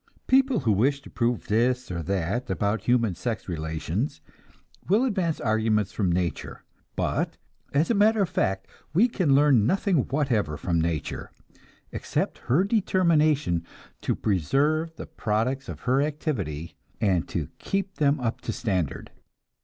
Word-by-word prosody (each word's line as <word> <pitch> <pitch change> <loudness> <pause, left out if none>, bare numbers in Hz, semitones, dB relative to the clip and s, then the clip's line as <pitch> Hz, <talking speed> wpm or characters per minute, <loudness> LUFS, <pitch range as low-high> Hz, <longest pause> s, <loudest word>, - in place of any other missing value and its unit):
People 265 - +3
who 115 -4 +2
wish 130 +8 +2
to - - -12
prove 120 -1 0
this 125 +2 +1
or 85 -1 -3
that 100 +8 -2
about 105 -1 -1
human 115 -5 +2
sex 115 +4 -4
relations 80 - -3 0.7
will 215 +7 +4
advance 185 -9 0
arguments 110 -2 +1
from 95 -5 0
nature; 85 -1 -2 0.3
but - - -1 0.3
as 150 +9 +2
a - - +4
matter 215 0 +4
of - - -1
fact 95 - 0 0.3
we 215 +8 +6
can 175 - +2
learn 135 -7 +5
nothing 190 +2 +2
whatever 115 - 0
from 85 +2 0
nature, 80 -2 -3 0.6
except - - -2
her 145 +10 +2
determination 155 - +2 0.4
to - - 0
preserve 145 - +1
the - - -7
products 125 +5 -2
of - - -7
her 130 +2 +2
activity 115 - -3 0.3
and 95 -6 +1
to - - -3
keep 195 0 -2
them 145 -1 +2
up 120 -2 -2
to - - -3
standard. 90 - -2
125 Hz, 145 wpm, -26 LUFS, 95-155 Hz, 0.7 s, we